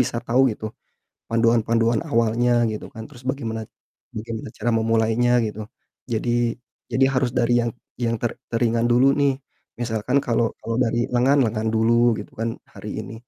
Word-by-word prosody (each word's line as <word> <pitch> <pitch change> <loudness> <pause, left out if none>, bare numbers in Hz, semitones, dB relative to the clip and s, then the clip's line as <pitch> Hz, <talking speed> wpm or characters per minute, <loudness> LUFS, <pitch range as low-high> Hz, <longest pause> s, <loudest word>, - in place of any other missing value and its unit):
bisa - - 0
tahu 120 +3 +3
gitu, 110 - -9 0.7
panduan-panduan 115 0 +2
awalnya 115 +1 +2 0.2
gitu 105 - -6
kan. 110 -2 -7
Terus 125 -4 -15
bagaimana 115 -5 -3 0.6
bagaimana 110 0 -5
cara 120 - -1
memulainya 115 +2 +2
gitu, 105 0 -5 0.5
jadi 115 +2 -1 0.6
jadi 130 +3 +4
harus 125 -1 +1
dari 120 0 +2
yang 120 0 -1 0.3
yang 115 0 +1
ter 120 - 0 0.2
teringan 115 0 +2
dulu 125 +2 +5
nih, 140 -1 +4 0.5
misalkan 115 +2 0
kalau 120 -1 +2 0.2
kalau 115 - -3
dari 120 0 0
lengan, 130 +4 +4
lengan 110 0 -1
dulu 110 +1 +3 0.3
gitu - - -13
kan 115 +1 0 0.2
hari - - -8
ini. - - -9
115 Hz, 155 wpm, -23 LUFS, 110-120 Hz, 0.7 s, dulu